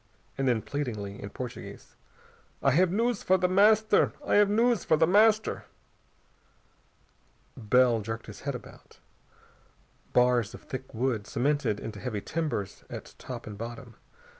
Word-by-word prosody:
And 135 Hz, -1 st, -1 dB
then 120 Hz, -3 st, +1 dB
pleadingly, 105 Hz, -9 st, -4 dB
in 100 Hz, -, -6 dB
Portuguese, 125 Hz, +2 st, -8 dB, 0.7 s
"I 135 Hz, -, +4 dB
have 175 Hz, +5 st, +3 dB
news 230 Hz, +2 st, 0 dB
for 185 Hz, -, +3 dB
The 180 Hz, 0 st, +1 dB
Master! 215 Hz, +4 st, +4 dB
I -, -, 0 dB
have 205 Hz, -1 st, +5 dB
news 230 Hz, 0 st, +2 dB
for 155 Hz, -, +3 dB
The 160 Hz, -, +4 dB
Master!" 215 Hz, +4 st, +3 dB, 1.9 s
Bell 120 Hz, +1 st, +3 dB
jerked 115 Hz, +2 st, -5 dB
his 105 Hz, -, -10 dB
head 140 Hz, -1 st, -3 dB
about. 125 Hz, -, -13 dB, 1.1 s
Bars 125 Hz, -3 st, +2 dB
of -, -, -13 dB
thick 130 Hz, 0 st, -7 dB
wood, 115 Hz, -3 st, -1 dB
cemented 140 Hz, -5 st, 0 dB
into 110 Hz, -, -7 dB
heavy 115 Hz, -5 st, -3 dB
timbers 150 Hz, -, -3 dB
at -, -, -8 dB
top 120 Hz, -2 st, -7 dB
and 105 Hz, -2 st, -9 dB
bottom. 120 Hz, +1 st, -7 dB
130 Hz, 140 wpm, -28 LUFS, 115-185 Hz, 1.9 s, have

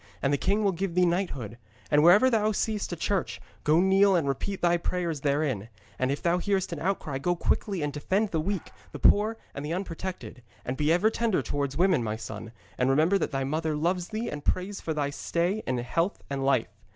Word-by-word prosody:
And 135 Hz, -, +2 dB
the -, -, +3 dB
king 205 Hz, +3 st, +1 dB
will 200 Hz, -, +3 dB
give 185 Hz, 0 st, -3 dB
thee 180 Hz, 0 st, +4 dB
knighthood. 140 Hz, -, -2 dB, 0.3 s
And 150 Hz, 0 st, +5 dB
wherever 180 Hz, +10 st, +7 dB
thou 215 Hz, -3 st, +2 dB
seest 215 Hz, -1 st, -2 dB
a -, -, -2 dB
church, 190 Hz, +2 st, -1 dB, 0.2 s
go 155 Hz, +2 st, +4 dB
kneel 190 Hz, +1 st, +5 dB
and 165 Hz, -5 st, +1 dB
repeat 180 Hz, +9 st, -3 dB
thy 175 Hz, 0 st, +4 dB
prayers 170 Hz, -3 st, -2 dB
therein; 140 Hz, -7 st, 0 dB, 0.3 s
and 130 Hz, -, +1 dB
if 140 Hz, -, -3 dB
thou 175 Hz, +1 st, +2 dB
hearest 195 Hz, 0 st, 0 dB
an -, -, -5 dB
outcry, 160 Hz, -7 st, -2 dB
go 175 Hz, +5 st, 0 dB
quickly 185 Hz, 0 st, -1 dB
and 145 Hz, -1 st, -2 dB
defend 190 Hz, +8 st, 0 dB
the 160 Hz, -, 0 dB
weak, 195 Hz, +1 st, -3 dB, 0.2 s
the -, -, -5 dB
poor 215 Hz, +2 st, +4 dB, 0.2 s
and 140 Hz, -, -6 dB
the 150 Hz, +3 st, -3 dB
unprotected. 180 Hz, -6 st, -5 dB, 0.2 s
And 125 Hz, -, -2 dB
be 150 Hz, +3 st, +1 dB
ever 180 Hz, +6 st, +3 dB
tender 225 Hz, -4 st, 0 dB
towards 140 Hz, -1 st, -2 dB
women, 180 Hz, -7 st, +3 dB
my 110 Hz, -1 st, -2 dB
son, 110 Hz, 0 st, -7 dB, 0.3 s
and 125 Hz, +1 st, +2 dB
remember 160 Hz, +8 st, +3 dB
that -, -, -1 dB
thy 135 Hz, -2 st, -2 dB
mother 155 Hz, +3 st, -1 dB
loves 175 Hz, +3 st, 0 dB
thee 220 Hz, +2 st, -4 dB
and 145 Hz, -1 st, -5 dB
prays 190 Hz, +2 st, -1 dB
for 160 Hz, -, -3 dB
thy 145 Hz, -1 st, -1 dB
stay 175 Hz, +8 st, -1 dB
in 130 Hz, -, 0 dB
health 165 Hz, -, -1 dB
and 135 Hz, -1 st, -2 dB
life. 135 Hz, -4 st, +1 dB
170 Hz, 215 wpm, -27 LUFS, 140-195 Hz, 0.3 s, wherever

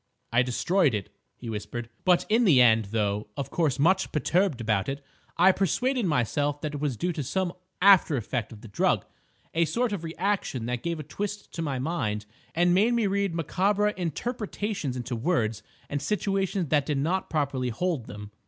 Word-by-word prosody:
"I 120 Hz, -, +5 dB
destroyed 135 Hz, -, +2 dB
it," 100 Hz, -3 st, -6 dB, 0.2 s
he 120 Hz, -, -9 dB
whispered. 115 Hz, +2 st, -5 dB, 0.2 s
"But, 180 Hz, -2 st, +4 dB
in 225 Hz, +3 st, +3 dB
the 160 Hz, -, +6 dB
end, 110 Hz, -3 st, +5 dB
though 105 Hz, 0 st, -1 dB
of 140 Hz, -, -4 dB
course 155 Hz, -7 st, +1 dB
much 190 Hz, +6 st, +2 dB
perturbed 170 Hz, -1 st, +1 dB
about 105 Hz, -2 st, 0 dB
it, 140 Hz, 0 st, -5 dB, 0.3 s
I 180 Hz, +3 st, +7 dB
persuaded 235 Hz, -, 0 dB
myself 145 Hz, +1 st, 0 dB
that 150 Hz, -1 st, -3 dB
it 145 Hz, -, -4 dB
was 140 Hz, -6 st, -1 dB
due 175 Hz, +6 st, -1 dB
to 155 Hz, -, -3 dB
some 175 Hz, +6 st, -1 dB, 0.3 s
after 190 Hz, -7 st, +6 dB
effect 115 Hz, 0 st, -3 dB
of 110 Hz, -2 st, -11 dB
the -, -, -10 dB
drug, 100 Hz, -, +1 dB, 0.5 s
a 165 Hz, +1 st, +3 dB
sort 230 Hz, -, 0 dB
of 185 Hz, -5 st, -4 dB
reaction 165 Hz, -, -2 dB
that 125 Hz, 0 st, -2 dB
gave 170 Hz, -1 st, -3 dB
a -, -, -4 dB
twist 205 Hz, +7 st, -5 dB
to 165 Hz, -, -4 dB
my 140 Hz, -5 st, -2 dB
mind 110 Hz, -8 st, -2 dB, 0.3 s
and 175 Hz, +1 st, +4 dB
made 220 Hz, +6 st, +3 dB
me 230 Hz, -2 st, +2 dB
read 200 Hz, -3 st, 0 dB
macabre 195 Hz, +6 st, +1 dB
interpretations 200 Hz, -, -3 dB
into 120 Hz, 0 st, -4 dB
words 115 Hz, -, 0 dB, 0.3 s
and 145 Hz, -1 st, -3 dB
situations 195 Hz, -1 st, -1 dB
that 145 Hz, -3 st, +2 dB
did 150 Hz, -2 st, 0 dB
not 175 Hz, +7 st, -1 dB
properly 140 Hz, -5 st, -1 dB
hold 150 Hz, +1 st, -2 dB
them." 105 Hz, 0 st, -9 dB
155 Hz, 185 wpm, -27 LUFS, 125-190 Hz, 0.5 s, I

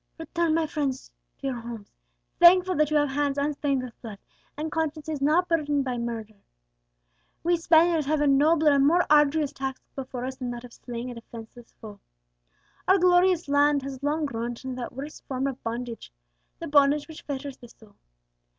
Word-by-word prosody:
"Return, 330 Hz, -1 st, -1 dB
my 330 Hz, -, +2 dB
brave 315 Hz, -, -4 dB
friends, 275 Hz, -3 st, -3 dB, 0.3 s
to -, -, -10 dB
your 265 Hz, -2 st, -2 dB
homes, 230 Hz, -3 st, -9 dB, 0.5 s
thankful 365 Hz, +1 st, +7 dB
that 305 Hz, -1 st, +3 dB
you 305 Hz, -, +2 dB
have 290 Hz, -1 st, +2 dB
hands 285 Hz, 0 st, -1 dB
unstained 280 Hz, -2 st, -1 dB
with 245 Hz, -3 st, -10 dB
blood, 220 Hz, -4 st, -8 dB, 0.4 s
and 310 Hz, +1 st, -4 dB
consciences 315 Hz, -2 st, -3 dB
not 320 Hz, +6 st, +3 dB
burdened 295 Hz, -4 st, 0 dB
by 250 Hz, -2 st, -2 dB
murder. 225 Hz, -3 st, -6 dB, 1.0 s
We 345 Hz, +1 st, +3 dB
Spaniards 330 Hz, -2 st, +3 dB
have 305 Hz, 0 st, +1 dB
a 295 Hz, -, +2 dB
nobler 300 Hz, +2 st, +4 dB
and 280 Hz, 0 st, +4 dB
more 350 Hz, +3 st, +3 dB
arduous 295 Hz, 0 st, +4 dB
task 265 Hz, -1 st, -4 dB, 0.2 s
before 255 Hz, -2 st, -5 dB
us 260 Hz, 0 st, -5 dB
than 250 Hz, -2 st, -4 dB
that 240 Hz, 0 st, -6 dB
of 245 Hz, -1 st, -12 dB
slaying 245 Hz, 0 st, -7 dB
a -, -, -7 dB
defenceless 230 Hz, 0 st, -12 dB
foe. 210 Hz, -2 st, -11 dB, 0.9 s
Our 380 Hz, -, +6 dB
glorious 360 Hz, -1 st, +3 dB
land 285 Hz, 0 st, +3 dB
has 270 Hz, -1 st, -7 dB
long 300 Hz, +2 st, 0 dB
groaned 235 Hz, -3 st, -4 dB
under 255 Hz, -1 st, -5 dB
that 240 Hz, -, -6 dB
worst 280 Hz, +4 st, -8 dB
form 265 Hz, 0 st, -2 dB
of 270 Hz, -1 st, -4 dB
bondage 235 Hz, -, -5 dB, 0.5 s
the -, -, -7 dB
bondage 285 Hz, 0 st, +3 dB
which 315 Hz, -2 st, -10 dB
fetters 280 Hz, -1 st, -6 dB
the 240 Hz, -, -13 dB
soul. 220 Hz, -3 st, -20 dB
280 Hz, 185 wpm, -26 LUFS, 250-310 Hz, 1.0 s, thankful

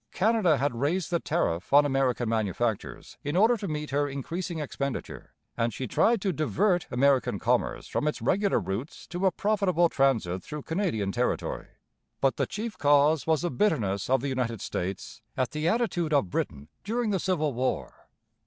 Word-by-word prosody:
Canada 205 Hz, -7 st, +3 dB
had 140 Hz, 0 st, 0 dB
raised 150 Hz, +10 st, -1 dB
the 170 Hz, -, +2 dB
tariff 105 Hz, -, -1 dB
on 145 Hz, +1 st, +7 dB
American 135 Hz, -3 st, +1 dB
manufactures 110 Hz, 0 st, -2 dB
in 145 Hz, +2 st, -2 dB
order 220 Hz, +6 st, +5 dB
to 205 Hz, -3 st, -5 dB
meet 150 Hz, -2 st, -4 dB
her 145 Hz, +1 st, +1 dB
increasing 165 Hz, +6 st, -4 dB
expenditure; 140 Hz, -2 st, -5 dB, 0.2 s
and 115 Hz, -2 st, -1 dB
she 130 Hz, -, -3 dB
tried 225 Hz, -, +2 dB
to 190 Hz, -1 st, -1 dB
divert 175 Hz, -, +1 dB
American 135 Hz, +1 st, +2 dB
commerce -, -, 0 dB
from 150 Hz, -, -1 dB
its 150 Hz, -, -1 dB
regular 200 Hz, +1 st, +2 dB
routes 105 Hz, +10 st, -5 dB
to 180 Hz, +3 st, -1 dB
a -, -, +3 dB
profitable 185 Hz, -4 st, +2 dB
transit 115 Hz, -, +1 dB
through 150 Hz, +9 st, -7 dB
Canadian 160 Hz, -, -1 dB
territory. 125 Hz, +5 st, -2 dB, 0.5 s
But 135 Hz, -3 st, +1 dB
the -, -, 0 dB
chief 215 Hz, +2 st, -5 dB
cause 145 Hz, +2 st, +4 dB
was 160 Hz, 0 st, +2 dB
the 175 Hz, -, 0 dB
bitterness 105 Hz, -, 0 dB
of 130 Hz, -1 st, +3 dB
the 140 Hz, -, -2 dB
United 125 Hz, -4 st, -2 dB
States 95 Hz, +8 st, -5 dB, 0.2 s
at 130 Hz, -2 st, 0 dB
the 155 Hz, +1 st, -2 dB
attitude 175 Hz, -8 st, 0 dB
of 120 Hz, -11 st, +2 dB
Britain 70 Hz, +2 st, -3 dB
during 225 Hz, +1 st, -1 dB
the 195 Hz, -, +1 dB
Civil 155 Hz, -6 st, 0 dB
War. 120 Hz, -, -3 dB
145 Hz, 170 wpm, -27 LUFS, 125-180 Hz, 0.5 s, on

